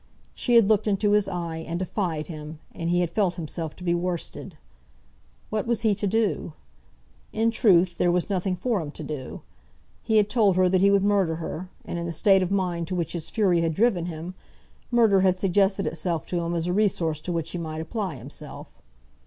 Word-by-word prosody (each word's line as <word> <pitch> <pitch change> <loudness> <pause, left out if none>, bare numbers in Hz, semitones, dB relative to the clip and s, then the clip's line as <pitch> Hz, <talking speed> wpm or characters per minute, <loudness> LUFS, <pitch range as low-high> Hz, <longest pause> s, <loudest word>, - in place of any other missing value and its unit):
She 245 - 0
had 230 -4 +7
looked 215 0 +2
into 205 0 +2
his 210 -1 +3
eye 170 -3 -4
and 165 +1 -4
defied 175 -4 -2
him, 155 -1 -8
and 165 0 -4
he 175 +1 +2
had 175 -2 -1
felt 185 -3 +1
himself 160 -1 -5
to 180 - -12
be 170 -1 +1
worsted. 175 -1 -4 0.9
What 215 +1 -1
was 235 -2 0
he 220 -2 +3
to 205 +1 -2
do? 210 -5 0 0.8
In 225 +1 +1
truth, 185 -7 +3
there 175 - +3
was 175 0 0
nothing 190 -1 -1
for 210 +1 -1
him 150 - -6
to 155 - -7
do. 145 -3 -6 0.6
He 220 -1 +1
had 210 -1 +4
told 210 -5 +3
her 185 0 +4
that 185 0 +2
he 200 - +5
would 200 -1 +3
murder 195 -5 +2
her; 170 +2 -6 0.2
and 175 - -4
in 170 - -3
the 170 - -4
state 195 +3 +4
of 185 - 0
mind 180 -4 -1
to 185 - -3
which 170 -3 -2
his 170 -3 -5
fury 185 -6 +2
had 165 -1 0
driven 195 -6 +2
him, 170 +2 -6 0.6
murder 225 -5 +4
had 185 -1 +3
suggested 195 +1 +2
itself 165 0 -2
to 175 - -2
him 170 0 -2
as 165 -1 -1
a 180 - 0
resource 175 -7 +1
to 180 - -4
which 165 -1 -2
he 175 - -4
might 155 -1 -5
apply 185 0 -3
himself. 135 +4 -8
180 Hz, 210 wpm, -25 LUFS, 165-200 Hz, 0.9 s, had